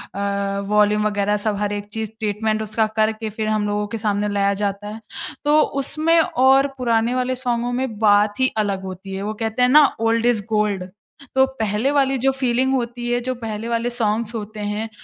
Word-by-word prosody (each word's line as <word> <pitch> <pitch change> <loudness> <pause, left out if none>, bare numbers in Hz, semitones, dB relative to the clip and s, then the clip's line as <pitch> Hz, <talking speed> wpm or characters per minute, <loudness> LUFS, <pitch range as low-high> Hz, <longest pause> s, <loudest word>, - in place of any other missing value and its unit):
अ, 200 0 -1
volume 210 0 +3
वग़ैरह 205 0 0
सब 215 -1 +1
हर 205 0 -1
एक 205 0 -4
चीज़ 220 -1 -3
ट्रीटमेंट 215 +1 -1
उसका 220 +1 0
करके 220 0 +1
फिर 215 +1 -4
हम 215 -1 0
लोगों 205 0 -1
के 225 - -5
सामने 210 -1 0
लाया 200 0 +1
जाता 200 0 -2
है। 215 +1 -7 0.5
तो 300 +1 +5 0.2
उसमें 315 +4 +2
और 270 -2 +3
पुराने 235 -1 +1
वाले 255 0 0
सॉन्गों 245 -1 -1
में 250 -3 -2
बात 205 0 +3
ही 260 0 +3
अलग 200 -3 0
होती 190 +1 -7
है। 190 - -4
वो 210 +1 -3
कहते 225 +2 -3
हैं 250 - +5
ना 295 +3 +7
ओल्ड 225 +1 +1
इज़ 235 -4 +2
गोल्ड। 210 -4 0 0.5
तो 265 0 +6
पहले 220 +4 0
वाली 270 -2 +2
जो 265 +2 +2
फीलिंग 260 0 0
होती 240 -1 -2
है 240 - +2
जो 255 +1 -2
पहले 225 -2 -5
वाले 235 0 0
सॉन्ग्स 230 -1 -1
होते 215 0 -6
हैं, 210 +2 -3
220 Hz, 200 wpm, -21 LUFS, 210-245 Hz, 0.5 s, ना